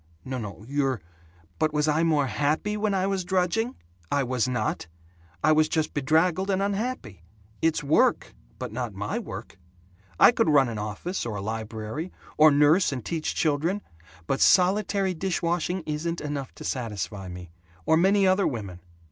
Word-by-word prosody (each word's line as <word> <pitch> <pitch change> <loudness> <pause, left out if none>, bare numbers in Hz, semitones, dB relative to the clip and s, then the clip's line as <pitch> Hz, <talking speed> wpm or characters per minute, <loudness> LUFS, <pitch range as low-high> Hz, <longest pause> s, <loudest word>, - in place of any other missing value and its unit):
"N 130 -2 -4
no, 105 0 -8
you're 135 -3 0 0.3
" 85 0 -31
"But 155 -1 +1
was 150 +1 +2
I 155 +1 +2
more 155 -4 +2
happy 150 +10 0
when 210 -1 0
I 190 0 +1
was 195 -1 -1
drudging? 190 +7 0 0.4
I 140 - +2
was 125 -1 0
not. 130 - -2 0.6
I - - +5
was 155 0 +4
just 160 -1 -1
bedraggled 160 +7 +2
and 190 -1 +1
unhappy. 200 - -3 0.4
It's 160 -2 +1
work 145 +2 +2 0.2
but 125 -3 -5
not 120 -3 -4
my 105 +2 -3
work. - - -8 0.6
I - - +8
could - - +1
run 140 -4 +4
an 110 -2 -4
office 105 - -4
or 115 -3 -4
a - - -3
library, 110 - -5 0.2
or 155 +1 +7
nurse 150 +5 +4
and 130 -4 -5
teach 165 -2 -2
children. 165 +6 0 0.4
But 135 - -1
solitary 195 +1 +3
dish 180 +1 -2
washing 175 +1 -1
isn't 160 +3 -3
enough 145 -3 -4
to - - -10
satisfy 105 -5 -4
me 90 -1 -9 0.3
or 160 - +4
many 195 +4 +4
other 190 +1 +3
women. 100 -9 -5
150 Hz, 170 wpm, -26 LUFS, 120-180 Hz, 0.6 s, I